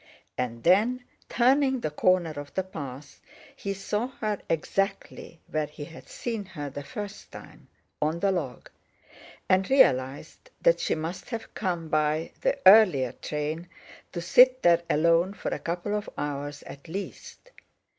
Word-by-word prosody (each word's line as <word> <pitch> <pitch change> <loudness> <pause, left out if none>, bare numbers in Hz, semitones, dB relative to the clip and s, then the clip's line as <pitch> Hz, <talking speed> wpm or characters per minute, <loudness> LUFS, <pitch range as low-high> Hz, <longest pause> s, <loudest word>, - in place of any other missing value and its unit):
And 120 -2 -3
then, 220 +8 +3 0.3
turning 265 +1 +3
the 155 - -2
corner 175 +1 +2
of 145 -1 -8
the 190 - +1
path, 145 -6 -9 0.3
he 200 0 -4
saw 210 +4 -2
her 215 -2 -1
exactly 195 +1 -2
where 155 -1 -2
he 150 0 -9
had 165 +2 -13
seen 230 -4 -4
her 150 -7 -7
the 145 +1 -6
first 205 - -8
time, - - -13 0.3
on 155 +3 0
the 195 +2 +2
log; 145 -10 -4 0.8
and 190 +1 +2
realised 135 - +2
that - - +4
she - - 0
must 165 +3 -5
have 230 -2 -6
come 175 -5 -2
by 155 +1 0
the - - +1
earlier 185 - +7
train 155 +3 -4 0.4
to 170 - -4
sit 255 +8 +5
there 170 -1 +5
alone 170 +5 +3
for - - -4
a - - -3
couple 175 +4 -3
of 210 0 -2
hours 145 0 -4
at 140 +4 -11
least. 200 - -8
175 Hz, 150 wpm, -27 LUFS, 150-210 Hz, 0.8 s, earlier